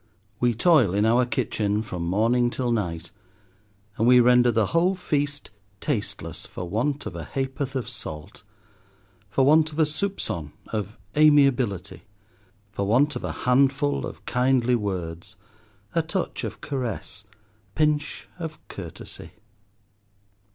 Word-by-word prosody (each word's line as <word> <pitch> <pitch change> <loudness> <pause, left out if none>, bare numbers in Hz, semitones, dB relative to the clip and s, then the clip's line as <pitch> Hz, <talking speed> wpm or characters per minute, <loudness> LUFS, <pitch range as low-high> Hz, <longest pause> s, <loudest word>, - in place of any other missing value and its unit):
We 120 -2 +2
toil 125 - +4
in 105 +1 +3
our 120 +2 +3
kitchen 110 -4 -1
from 90 -5 -6
morning 115 +6 +2
till 125 0 -2
night, 85 -7 -2 0.9
and 115 - +2
we 125 0 +7
render 125 0 +5
the 110 -1 +2
whole 175 +3 +3
feast 145 -6 -2 0.3
tasteless 100 - -3
for 90 - -6
want 135 +10 -1
of - - -6
a - - -5
ha'porth 135 0 -3
of 130 -3 -2
salt—for 100 - -6
want 155 +2 +5
of 150 - -10
a 160 - +4
soupcon 150 - -3 0.2
of 105 -1 -4 0.2
amiability, 135 - +3 0.7
for 100 -1 -2
want 130 +8 +3
of - - -5
a - - -2
handful 140 +3 +2
of - - -11
kindly 125 0 +2
words, 90 -7 -3 0.6
a - - +3
touch - - -3
of - - -5
caress, 120 -6 -4
a 100 - -27 0.4
pinch 150 -1 0
of 160 -2 -5
courtesy. 85 -2 -9
120 Hz, 130 wpm, -25 LUFS, 100-140 Hz, 0.9 s, we